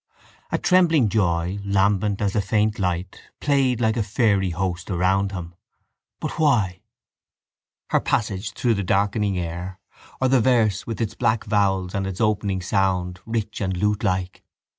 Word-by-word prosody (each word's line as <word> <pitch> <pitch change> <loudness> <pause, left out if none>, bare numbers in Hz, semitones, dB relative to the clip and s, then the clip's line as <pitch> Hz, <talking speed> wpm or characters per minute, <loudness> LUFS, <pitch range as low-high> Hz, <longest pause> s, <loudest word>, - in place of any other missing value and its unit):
A - - +1
trembling 165 - +3
joy, 90 -2 0
lambent 100 +1 +1
as 100 -1 0
a 105 - +3
faint 105 +2 0
light, 90 -1 -2 0.2
played 135 -4 +2
like 110 -2 +1
a - - +2
fairy 100 -2 +1
host 90 0 -3
around 95 +2 +1
him. 90 -3 -6 0.7
But - - -5
why? 110 - +2 1.1
Her - - +4
passage 105 -1 -1
through 120 -2 +1
the 100 -2 -2
darkening 100 +1 +1
air 90 +2 -5 0.4
or 130 - +2
the 130 -1 +4
verse 110 -5 +2
with 115 0 -4
its 110 - -1
black 115 -2 0
vowels 95 -3 0
and 95 -2 -1
its 95 -1 -5
opening 100 -4 0
sound, 90 -2 0
rich 110 -2 -3
and 95 -2 -1
lutelike? 95 -2 -1
100 Hz, 150 wpm, -23 LUFS, 95-110 Hz, 1.1 s, Her